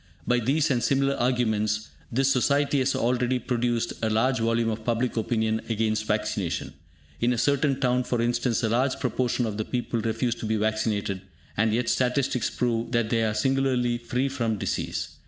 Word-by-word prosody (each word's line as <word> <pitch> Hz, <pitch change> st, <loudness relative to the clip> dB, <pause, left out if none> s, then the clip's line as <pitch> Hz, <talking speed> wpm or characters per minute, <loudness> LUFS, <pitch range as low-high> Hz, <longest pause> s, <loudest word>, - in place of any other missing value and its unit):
By 125 Hz, 0 st, +2 dB
these 140 Hz, +6 st, +1 dB
and 120 Hz, -2 st, +1 dB
similar 135 Hz, +1 st, +2 dB
arguments, 110 Hz, -4 st, 0 dB, 0.2 s
this 135 Hz, +3 st, +2 dB
society 140 Hz, +2 st, +2 dB
has 130 Hz, +1 st, +1 dB
already 125 Hz, +1 st, +1 dB
produced 120 Hz, -2 st, -1 dB
a 110 Hz, -, +1 dB
large 125 Hz, +4 st, +2 dB
volume 115 Hz, 0 st, +1 dB
of 110 Hz, 0 st, -5 dB
public 120 Hz, +2 st, 0 dB
opinion 110 Hz, -1 st, 0 dB
against 110 Hz, -1 st, 0 dB
vaccination. 105 Hz, -4 st, -2 dB, 0.5 s
In 120 Hz, -, +2 dB
a 120 Hz, -, 0 dB
certain 140 Hz, +2 st, +1 dB
town, 125 Hz, -1 st, +2 dB
for 120 Hz, -, -1 dB
instance, 120 Hz, +1 st, 0 dB
a 115 Hz, -, +2 dB
large 130 Hz, +4 st, +1 dB
proportion 125 Hz, -1 st, 0 dB
of 105 Hz, -2 st, -3 dB
the 110 Hz, -, -1 dB
people 120 Hz, -2 st, -2 dB
refuse 115 Hz, +2 st, 0 dB
to 110 Hz, -, -5 dB
be 110 Hz, -, +1 dB
vaccinated, 105 Hz, -2 st, -1 dB, 0.3 s
and 110 Hz, +1 st, +2 dB
yet 115 Hz, +2 st, 0 dB
statistics 125 Hz, -1 st, +1 dB
prove 120 Hz, -1 st, -1 dB
that 115 Hz, -2 st, +1 dB
they 115 Hz, -1 st, +2 dB
are 110 Hz, -1 st, 0 dB
singularly 125 Hz, 0 st, +1 dB
free 125 Hz, +3 st, -1 dB
from 115 Hz, -5 st, -1 dB
disease. -, -, -3 dB
120 Hz, 175 wpm, -26 LUFS, 110-125 Hz, 0.5 s, By